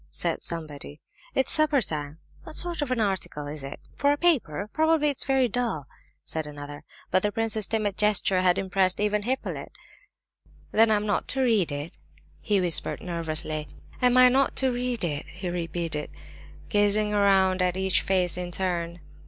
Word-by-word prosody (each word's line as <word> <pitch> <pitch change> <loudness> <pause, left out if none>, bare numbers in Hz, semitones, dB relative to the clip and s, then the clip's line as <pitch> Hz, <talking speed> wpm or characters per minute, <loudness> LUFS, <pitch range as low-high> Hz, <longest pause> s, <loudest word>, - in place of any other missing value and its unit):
said - - -2
somebody; 155 -3 -5 0.4
"it's 265 - +2
supper 305 -2 +3
time." 150 - -3 0.2
"What 315 - -9
sort 345 -2 +1
of 290 - -2
an 255 -2 0
article 190 -8 -2
is 145 0 -6
it? 135 - -7 0.2
For 285 0 +2
a 290 - +1
paper? 235 - +1
Probably 315 -1 +2
it's 280 - 0
very 265 -1 +2
dull," 230 - -2 0.4
said 160 -1 -4
another. 145 0 -9 0.3
But 185 - +3
the 210 - 0
prince's 220 -1 +1
timid 210 -3 -1
gesture 200 -3 +2
had 180 -1 +3
impressed 190 -1 +1
even 210 0 +1
Hippolyte. 255 +5 -3 1.0
"Then 225 +1 +4
I'm 210 -1 +2
not 205 -3 -1
to 270 - 0
read 215 - +2
it?" 145 +3 -6 0.4
he 205 -3 +1
whispered, 175 -3 +4
nervously. 155 -3 -4 0.3
"Am 250 0 +4
I 255 0 +9
not 270 +2 +2
to 265 -1 +2
read 245 -2 -2
it?" 150 -3 -3
he 180 0 -6
repeated, 165 -3 -3 0.6
gazing 210 0 +2
around 195 -2 +3
at 180 0 +1
each 190 -1 +2
face 180 -2 +2
in 180 -1 -4
turn. 175 -2 -3
195 Hz, 170 wpm, -26 LUFS, 170-240 Hz, 1.0 s, I